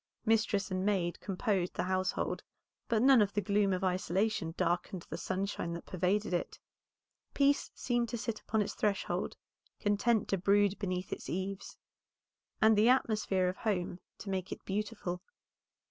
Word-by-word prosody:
Mistress 215 Hz, -3 st, +2 dB
and 185 Hz, 0 st, -1 dB
maid 190 Hz, -4 st, 0 dB
composed 195 Hz, -2 st, -1 dB
the -, -, 0 dB
household, 185 Hz, 0 st, -1 dB, 0.5 s
but 230 Hz, -1 st, +2 dB
none 265 Hz, -3 st, +7 dB
of 205 Hz, -1 st, +1 dB
the 205 Hz, -, +1 dB
gloom 205 Hz, -1 st, +2 dB
of 185 Hz, 0 st, -1 dB
isolation 185 Hz, -1 st, 0 dB
darkened 175 Hz, 0 st, 0 dB
the -, -, -2 dB
sunshine 190 Hz, -2 st, -2 dB
that 170 Hz, -, -6 dB
pervaded 185 Hz, +2 st, 0 dB
it; 175 Hz, -, -2 dB, 0.8 s
peace 280 Hz, 0 st, +3 dB
seemed 240 Hz, -2 st, 0 dB
to 235 Hz, -, -3 dB
sit 225 Hz, -1 st, -3 dB
upon 220 Hz, -1 st, +1 dB
its -, -, -5 dB
threshold, 205 Hz, -2 st, -1 dB, 0.4 s
content 210 Hz, +1 st, +2 dB
to 195 Hz, -, +1 dB
brood 200 Hz, +1 st, +3 dB
beneath 185 Hz, -2 st, -2 dB
its -, -, -7 dB
eaves, 190 Hz, +2 st, -4 dB, 0.8 s
and 220 Hz, 0 st, +6 dB
the 215 Hz, +3 st, +5 dB
atmosphere 215 Hz, -7 st, +2 dB
of 180 Hz, -, -2 dB
home 180 Hz, -5 st, -1 dB, 0.2 s
to 200 Hz, -, -6 dB
make 185 Hz, -1 st, -2 dB
it -, -, -7 dB
beautiful. 200 Hz, -3 st, -3 dB
200 Hz, 155 wpm, -32 LUFS, 185-215 Hz, 0.8 s, none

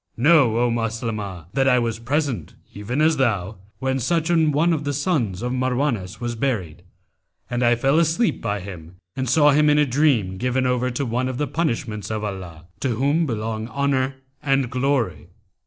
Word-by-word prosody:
Know, 135 Hz, -3 st, +4 dB
O 120 Hz, 0 st, +2 dB
Maslamah, 110 Hz, -6 st, -3 dB
that 135 Hz, 0 st, +2 dB
I 125 Hz, -1 st, +5 dB
was 115 Hz, -2 st, -1 dB
present, 130 Hz, -, -2 dB, 0.2 s
even 115 Hz, +8 st, -3 dB
as 160 Hz, 0 st, +3 dB
thou, 105 Hz, -6 st, 0 dB, 0.2 s
when 130 Hz, 0 st, -1 dB
such 165 Hz, +5 st, 0 dB
an 160 Hz, -3 st, +3 dB
one 165 Hz, +4 st, +2 dB
of 155 Hz, -2 st, -2 dB
the 145 Hz, 0 st, -2 dB
sons 130 Hz, -, -1 dB
of 125 Hz, +1 st, -1 dB
Marwanwas 125 Hz, -6 st, -1 dB, 0.2 s
buried, 105 Hz, -, -2 dB, 0.7 s
and 120 Hz, 0 st, -1 dB
I 120 Hz, 0 st, +4 dB
fell 135 Hz, +6 st, +2 dB
asleep 170 Hz, +8 st, +1 dB
by 105 Hz, -3 st, -2 dB
him 90 Hz, -3 st, -10 dB, 0.2 s
and 130 Hz, -2 st, -2 dB
saw 150 Hz, +3 st, +5 dB
him 150 Hz, +1 st, +4 dB
in 150 Hz, -, +4 dB
a 150 Hz, -, +4 dB
dream 125 Hz, -9 st, +1 dB
given 125 Hz, +4 st, 0 dB
over 125 Hz, 0 st, +1 dB
to 125 Hz, +3 st, -2 dB
one 125 Hz, +2 st, -1 dB
of 130 Hz, -, -4 dB
the 150 Hz, -, 0 dB
punishments 120 Hz, -8 st, -2 dB
of 110 Hz, -1 st, -3 dB
Allah, 90 Hz, -5 st, -6 dB
to 130 Hz, -4 st, -1 dB
whom 145 Hz, +7 st, +1 dB
belong 110 Hz, -1 st, -3 dB
Honour 135 Hz, 0 st, 0 dB, 0.3 s
and 135 Hz, -3 st, +1 dB
Glory! 125 Hz, -, -1 dB
125 Hz, 180 wpm, -22 LUFS, 110-145 Hz, 0.7 s, I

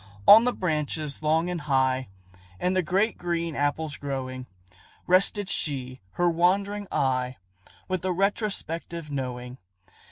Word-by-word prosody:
On 225 Hz, +3 st, +10 dB
the 250 Hz, -, +3 dB
branches 155 Hz, -, -2 dB
long 160 Hz, +2 st, +2 dB
and 180 Hz, -2 st, -3 dB
high, 130 Hz, -3 st, +1 dB, 0.5 s
And 180 Hz, +1 st, 0 dB
the 185 Hz, -, +3 dB
great 195 Hz, +7 st, 0 dB
green 170 Hz, -2 st, -2 dB
apples 145 Hz, +1 st, -1 dB
growing, 130 Hz, -2 st, -5 dB, 0.6 s
Rested 190 Hz, +2 st, +3 dB
she 130 Hz, -7 st, -1 dB
her 175 Hz, -, +1 dB
wandering 195 Hz, +4 st, +1 dB
eye, 130 Hz, -1 st, 0 dB, 0.5 s
With 185 Hz, -2 st, -2 dB
a 185 Hz, -, 0 dB
retrospective 175 Hz, -5 st, -2 dB
knowing. 125 Hz, -2 st, -5 dB
160 Hz, 125 wpm, -26 LUFS, 135-185 Hz, 0.6 s, On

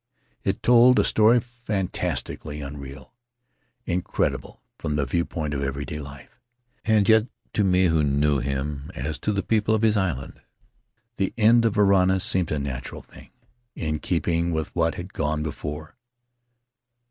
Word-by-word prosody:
It -, -, -2 dB
told 125 Hz, +1 st, +6 dB
a -, -, +5 dB
story 110 Hz, +3 st, +4 dB
fantastically 105 Hz, -9 st, -4 dB
unreal 70 Hz, -1 st, -9 dB, 0.4 s
— 120 Hz, -2 st, -47 dB
incredible 90 Hz, -, -2 dB, 0.2 s
from 75 Hz, -2 st, -2 dB
the 75 Hz, -2 st, 0 dB
viewpoint 80 Hz, -2 st, -2 dB
of 70 Hz, -, -2 dB
everyday 70 Hz, +2 st, -4 dB
life 70 Hz, -1 st, -11 dB, 0.2 s
— 120 Hz, -, -41 dB
and 110 Hz, -3 st, +3 dB
yet 110 Hz, +1 st, +5 dB, 0.3 s
to 105 Hz, -, +2 dB
me 95 Hz, -1 st, +3 dB
who 80 Hz, -2 st, +3 dB
knew 70 Hz, 0 st, +2 dB
him, 70 Hz, +2 st, -3 dB
as 75 Hz, +1 st, -4 dB
to 105 Hz, -, -1 dB
the 100 Hz, -1 st, -1 dB
people 110 Hz, 0 st, +2 dB
of 110 Hz, -, -1 dB
his 110 Hz, -1 st, +4 dB
island, 85 Hz, -9 st, -3 dB, 0.8 s
the 95 Hz, -, -1 dB
end 115 Hz, +1 st, +5 dB
of 110 Hz, -, +1 dB
Varana 95 Hz, -2 st, +4 dB
seemed 90 Hz, -2 st, 0 dB
a 75 Hz, -, 0 dB
natural 70 Hz, -3 st, -5 dB
thing, -, -, -16 dB, 0.5 s
in 75 Hz, -1 st, -2 dB
keeping 85 Hz, +1 st, 0 dB
with 80 Hz, -1 st, -3 dB
what 80 Hz, -1 st, +1 dB
had 90 Hz, +3 st, -8 dB
gone 75 Hz, 0 st, -1 dB
before. 75 Hz, +2 st, -6 dB
85 Hz, 155 wpm, -24 LUFS, 75-105 Hz, 0.8 s, told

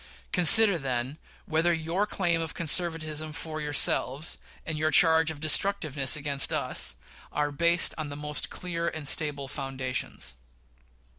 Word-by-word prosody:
Consider, 190 Hz, +2 st, +7 dB
then, 130 Hz, +1 st, -5 dB, 0.3 s
whether 165 Hz, +2 st, 0 dB
your 170 Hz, +5 st, -2 dB
claim 170 Hz, -5 st, -1 dB
of 165 Hz, -1 st, -7 dB
conservatism 155 Hz, -2 st, -1 dB
for 155 Hz, 0 st, -7 dB
yourselves, 145 Hz, 0 st, 0 dB, 0.3 s
and 160 Hz, -, -5 dB
your 155 Hz, +1 st, -1 dB
charge 160 Hz, +1 st, +3 dB
of 155 Hz, -2 st, -6 dB
destructiveness 155 Hz, -4 st, +2 dB
against 145 Hz, -2 st, +1 dB
us, -, -, +1 dB, 0.4 s
are 145 Hz, 0 st, -2 dB
based 170 Hz, +4 st, +2 dB
on 155 Hz, -2 st, -5 dB
the 145 Hz, -, -8 dB
most 150 Hz, 0 st, -3 dB
clear 170 Hz, -2 st, -5 dB
and 155 Hz, -3 st, -6 dB
stable 145 Hz, -2 st, 0 dB
foundations. 130 Hz, -, -6 dB
155 Hz, 135 wpm, -26 LUFS, 145-165 Hz, 0.4 s, Consider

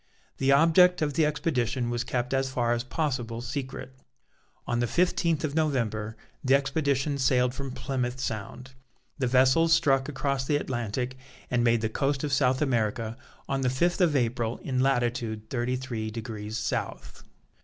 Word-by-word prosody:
The 135 Hz, 0 st, +3 dB
object 165 Hz, +4 st, +5 dB
of 145 Hz, -1 st, -1 dB
the 155 Hz, +1 st, +3 dB
expedition 130 Hz, -5 st, -1 dB
was 120 Hz, 0 st, -1 dB
kept 125 Hz, +1 st, -2 dB
as 135 Hz, 0 st, +1 dB
far 120 Hz, -2 st, 0 dB
as 120 Hz, 0 st, -1 dB
possible 125 Hz, -4 st, -2 dB
secret. 130 Hz, +1 st, -5 dB, 0.7 s
On 120 Hz, -, -1 dB
the 120 Hz, -, +1 dB
fifteenth 170 Hz, 0 st, +1 dB
of 150 Hz, -2 st, -1 dB
November 115 Hz, -8 st, -1 dB, 0.3 s
the 135 Hz, 0 st, +5 dB
expedition 140 Hz, 0 st, 0 dB
sailed 125 Hz, -1 st, +2 dB
from 135 Hz, 0 st, -5 dB
Plymouth 125 Hz, -1 st, -3 dB
Sound. 125 Hz, +2 st, -5 dB, 0.5 s
The 130 Hz, -, +1 dB
vessels 130 Hz, +6 st, +4 dB
struck 135 Hz, 0 st, +3 dB
across 140 Hz, -1 st, -1 dB
the 145 Hz, +3 st, 0 dB
Atlantic 125 Hz, -1 st, -2 dB, 0.3 s
and 120 Hz, -1 st, +2 dB
made 120 Hz, -1 st, +3 dB
the 110 Hz, -, +1 dB
coast 135 Hz, +4 st, -1 dB
of 145 Hz, -2 st, -1 dB
South 130 Hz, +1 st, +3 dB
America 115 Hz, -3 st, -1 dB, 0.3 s
on 135 Hz, 0 st, -1 dB
the 130 Hz, -, +2 dB
fifth 175 Hz, +9 st, +1 dB
of 165 Hz, -5 st, +3 dB
April 120 Hz, -2 st, 0 dB
in 130 Hz, -2 st, -1 dB
latitude 120 Hz, -4 st, 0 dB
thirty 125 Hz, 0 st, 0 dB
three 120 Hz, -4 st, -4 dB
degrees 110 Hz, -1 st, -5 dB
South. -, -, -4 dB
130 Hz, 160 wpm, -27 LUFS, 120-140 Hz, 0.7 s, object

